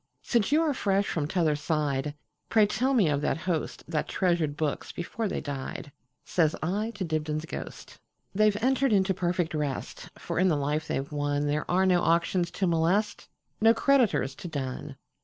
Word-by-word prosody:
"Since 235 Hz, -2 st, +1 dB
you 310 Hz, +2 st, +4 dB
are 305 Hz, -3 st, +1 dB
fresh 200 Hz, -5 st, +1 dB
from 150 Hz, -3 st, -1 dB
t'other 160 Hz, -3 st, +1 dB
side, 145 Hz, -2 st, -1 dB, 0.3 s
Pray 220 Hz, -2 st, +5 dB
tell 260 Hz, +6 st, 0 dB
me 210 Hz, -8 st, +4 dB
of 145 Hz, -1 st, +1 dB
that -, -, 0 dB
hostThat 160 Hz, -2 st, -3 dB
treasured 170 Hz, -5 st, 0 dB
books 150 Hz, -2 st, -2 dB
before 215 Hz, +6 st, -3 dB
they -, -, -3 dB
died,"Says 140 Hz, +2 st, -3 dB
I 205 Hz, +7 st, -1 dB
to 200 Hz, -, -3 dB
Dibdin's 155 Hz, -1 st, -2 dB
ghost."They 215 Hz, +5 st, -3 dB
've 205 Hz, -, -2 dB
entered 265 Hz, -1 st, +3 dB
into 190 Hz, -1 st, +3 dB
perfect 175 Hz, -2 st, -1 dB
rest; 150 Hz, -3 st, -4 dB
For -, -, -3 dB
in 185 Hz, -, +4 dB
the 165 Hz, -, +3 dB
life 150 Hz, +2 st, -1 dB
they -, -, -1 dB
've 135 Hz, +2 st, -4 dB
wonThere 145 Hz, +1 st, -1 dB
are 185 Hz, +2 st, +3 dB
no 180 Hz, -2 st, +4 dB
auctions 170 Hz, +1 st, +2 dB
to 195 Hz, -, -2 dB
molest, 180 Hz, +5 st, +1 dB, 0.3 s
No 225 Hz, +1 st, +6 dB
creditors 245 Hz, -, +2 dB
to -, -, -7 dB
dun. 135 Hz, -5 st, -5 dB
170 Hz, 170 wpm, -28 LUFS, 150-200 Hz, 0.3 s, No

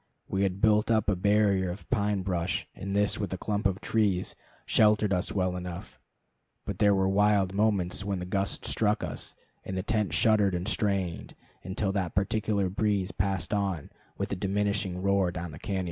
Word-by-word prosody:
We 95 Hz, -, -1 dB
had 95 Hz, 0 st, 0 dB
built 105 Hz, 0 st, +4 dB
up 110 Hz, -2 st, +3 dB
a -, -, +1 dB
barrier 100 Hz, -1 st, +2 dB
of 90 Hz, +3 st, -7 dB
pine 105 Hz, -4 st, +1 dB
brush, 90 Hz, -2 st, -1 dB
and 100 Hz, +1 st, -5 dB
this, 105 Hz, 0 st, +2 dB
with 100 Hz, -, -3 dB
a -, -, -3 dB
clump 105 Hz, +1 st, 0 dB
of 95 Hz, 0 st, -2 dB
trees, 100 Hz, -5 st, 0 dB, 0.3 s
sheltered 105 Hz, -1 st, +3 dB
us 90 Hz, 0 st, 0 dB
well 90 Hz, -2 st, 0 dB
enough; 90 Hz, -1 st, -7 dB, 0.7 s
but -, -, -5 dB
there 100 Hz, -1 st, +5 dB
were 95 Hz, 0 st, +2 dB
wild 100 Hz, -1 st, +3 dB
moments 100 Hz, -3 st, +1 dB
when 100 Hz, -1 st, -2 dB
the 90 Hz, -, -4 dB
gust 95 Hz, +2 st, -2 dB
struck 105 Hz, 0 st, +1 dB
us, -, -, -4 dB, 0.3 s
and 95 Hz, -, -5 dB
the 95 Hz, -, -2 dB
tent 105 Hz, -5 st, 0 dB
shuddered 100 Hz, +2 st, +3 dB
and 90 Hz, +2 st, -3 dB
strained, 100 Hz, -5 st, -1 dB, 0.3 s
until 95 Hz, +1 st, -2 dB
that 95 Hz, -3 st, -2 dB
particular 100 Hz, 0 st, +1 dB
breeze 100 Hz, 0 st, 0 dB
passed 95 Hz, 0 st, -1 dB
on 95 Hz, -7 st, -1 dB, 0.3 s
with -, -, -3 dB
a -, -, 0 dB
diminishing 100 Hz, -1 st, -1 dB
roar 100 Hz, -2 st, +2 dB
down 90 Hz, -1 st, -5 dB
the 75 Hz, -, -10 dB
cañon. 95 Hz, -2 st, -2 dB
100 Hz, 185 wpm, -28 LUFS, 95-105 Hz, 0.7 s, there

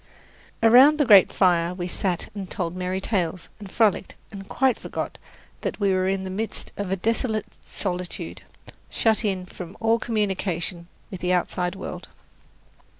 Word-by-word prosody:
Around 255 Hz, +7 st, +7 dB
the 295 Hz, -, +3 dB
great 205 Hz, -6 st, +7 dB
fire 175 Hz, -1 st, +2 dB
we 180 Hz, -1 st, -4 dB
sat 180 Hz, -1 st, -2 dB
and 195 Hz, -3 st, -6 dB
told 175 Hz, -2 st, -3 dB
merry 185 Hz, +1 st, -2 dB
tales, 185 Hz, -4 st, -2 dB
and 205 Hz, -2 st, -9 dB
frolicked, 220 Hz, -4 st, +1 dB, 0.2 s
and 195 Hz, -1 st, -9 dB
quite 260 Hz, -3 st, +2 dB
forgot -, -, -5 dB, 0.4 s
that -, -, -3 dB
we 200 Hz, -2 st, +2 dB
were 185 Hz, 0 st, +1 dB
in 190 Hz, 0 st, 0 dB
the 190 Hz, -, -5 dB
midst 215 Hz, +4 st, -4 dB
of 205 Hz, -2 st, -4 dB
a 195 Hz, -, +1 dB
desolate 220 Hz, +2 st, -1 dB, 0.2 s
solitude, 180 Hz, -2 st, -3 dB, 0.5 s
shut 225 Hz, 0 st, +2 dB
in 190 Hz, -3 st, -1 dB
from 180 Hz, -1 st, -10 dB
all 225 Hz, +1 st, +2 dB
communication 190 Hz, -6 st, -2 dB, 0.2 s
with 190 Hz, -, -7 dB
the 180 Hz, 0 st, +1 dB
outside 180 Hz, 0 st, -1 dB
world. -, -, -7 dB
190 Hz, 155 wpm, -24 LUFS, 180-215 Hz, 0.5 s, Around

